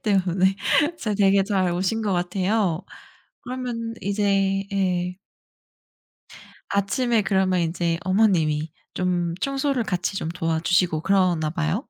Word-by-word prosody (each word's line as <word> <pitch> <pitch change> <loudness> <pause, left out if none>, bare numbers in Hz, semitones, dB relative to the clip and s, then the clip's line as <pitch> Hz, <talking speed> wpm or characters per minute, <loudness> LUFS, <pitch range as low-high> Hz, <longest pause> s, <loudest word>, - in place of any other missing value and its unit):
때문에 190 -2 +2 0.4
잘 215 -2 -2
되게 195 -1 +4
잘 190 -3 0
오신 190 +6 -1
것 205 -3 0
같아요. 180 0 0 0.6
그러면 245 -3 -4
이제 195 -1 +1
예. 180 -2 0 1.5
아침에 215 +4 +1
그러면 190 -2 +1
인제 170 0 -1
어머님이 170 -6 +2 0.2
좀 175 -2 -1
청소를 275 -2 0
같이 180 -1 -2
좀 160 - -3
도와주시고 165 0 +1
그러나 180 -4 +2
봐요? 165 +6 -1
190 Hz, 240 characters per minute, -23 LUFS, 175-205 Hz, 1.5 s, 되게